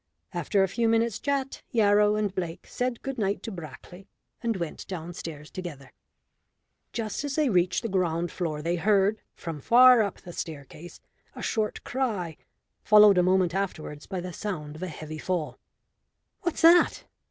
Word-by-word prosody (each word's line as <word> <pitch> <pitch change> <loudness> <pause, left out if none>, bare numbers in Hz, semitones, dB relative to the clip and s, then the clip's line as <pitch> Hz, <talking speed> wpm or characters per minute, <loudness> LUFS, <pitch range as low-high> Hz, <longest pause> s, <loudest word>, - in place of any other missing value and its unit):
After 200 -2 +1
a - - +2
few 230 +4 0
minutes' 225 -1 +1
chat 275 -1 -2
Yarrow 210 -3 +4
and 210 -2 -1
Blake 175 -3 -4
said 250 -1 -3
good 270 -2 -4
night 200 -1 -1
to 225 - -5
Brackley, 175 +2 -10 0.3
and 230 -3 -1
went 170 -3 -5
downstairs 165 -4 -7
together. 155 -8 -8 1.0
Just 225 +2 -3
as 285 -2 -3
they 300 -5 +2
reached 180 -1 +2
the - - -1
ground 175 -4 0
floor 155 -4 -3
they 170 +2 0
heard, 205 +3 +2
from 160 -4 -6
far 250 - +7
up 200 -3 -2
the 175 - -11
staircase, 160 +2 -8 0.3
a - - -7
short 215 -1 -1
cry, 210 - -2 0.5
followed 210 -3 +7
a - - +6
moment 185 -1 +2
afterwards 165 -6 -4
by 190 -2 -4
the 180 0 -6
sound 155 -7 -5
of 155 - -10
a 185 - -2
heavy 155 -1 -7
fall. 175 -4 -3 0.8
"What's 345 - -2
that?" 340 +1 +6
190 Hz, 165 wpm, -27 LUFS, 170-220 Hz, 1.0 s, far